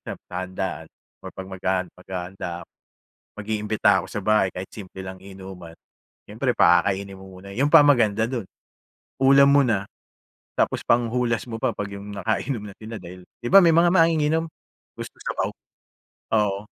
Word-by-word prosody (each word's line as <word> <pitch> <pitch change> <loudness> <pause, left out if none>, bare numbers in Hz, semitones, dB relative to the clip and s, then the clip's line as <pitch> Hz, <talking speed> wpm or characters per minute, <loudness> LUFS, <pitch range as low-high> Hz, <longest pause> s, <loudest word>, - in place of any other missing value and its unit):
sa - - -4 0.2
handaan 95 -2 -4 0.3
or - - -8
'pag 95 - -7
maghahan 95 0 -1
maghahanda 90 -1 -6
ako. - - -17 0.7
Mag-iimbita 105 -1 +1
ako 95 - -7
sa 105 - -5
bahay, 105 -2 +3
kahit 95 +1 -6
simple 95 -2 -10
lang 95 0 -8
inuman. 95 -3 -11 0.6
Siyempre - - -1
pakakainin 95 +2 +3
mo 95 -1 -12
muna 100 +1 -11
yun 130 +8 +1
pa 165 - +10
ang 145 - +7
maganda 110 -5 +2
do'n, 120 -6 -3 0.8
ulam 140 +1 +7
mo 140 0 +6
na, 105 -5 0 0.7
tapos - - +1
panghulas 120 0 +1
mo 115 - -4
pa, 130 -3 +1
'pag 100 -1 -5
yung 100 +1 -8
nakainom 110 +3 -2
na 100 - -13
sila 110 +1 -8
dahil 90 +1 -11 0.2
'di - - -4
ba 195 - +10
may 165 -1 +5
mga 170 +1 +5
manginginom 160 -2 +3 0.5
gusto - - -8
sabaw? - - -2 0.9
Oo, 105 -2 +2
100 Hz, 160 wpm, -23 LUFS, 95-120 Hz, 0.9 s, pa